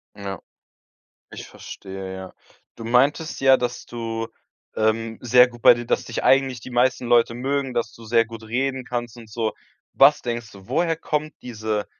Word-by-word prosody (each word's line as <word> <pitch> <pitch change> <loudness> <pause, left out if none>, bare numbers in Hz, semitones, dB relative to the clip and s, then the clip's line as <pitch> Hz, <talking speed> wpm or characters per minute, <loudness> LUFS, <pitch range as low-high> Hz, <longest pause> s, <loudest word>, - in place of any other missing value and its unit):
Ja. 100 -3 -6 0.9
Ich - - -9
verstehe, 95 -1 -8
ja. 95 0 -9 0.4
Du 115 - -9
meintest 135 +7 +1
ja, 135 -1 +6
dass 120 0 -4
du, 115 -1 -4 0.5
ähm, 110 +1 0
sehr 125 +1 +6
gut 120 -1 -14
bei - - +9
dir 120 0 -6
dass - - 0
dich 115 - -4
eigentlich 135 -2 +3
die 130 - -10
meisten 125 0 +1
Leute 120 -1 +3
mögen, 135 +1 -2
dass 115 -2 -1
du 115 - -14
sehr 115 +1 +3
gut 115 0 -10
reden 130 +3 -2
kannst 120 -2 -4
und 115 -2 -12
so. 110 0 -2 0.4
Was 140 +2 +6
denkst 120 -2 -4
du? 95 -1 -15
Woher 165 -2 +1
kommt 155 -1 -3
diese 110 -3 -3
120 Hz, 175 wpm, -23 LUFS, 110-130 Hz, 0.9 s, bei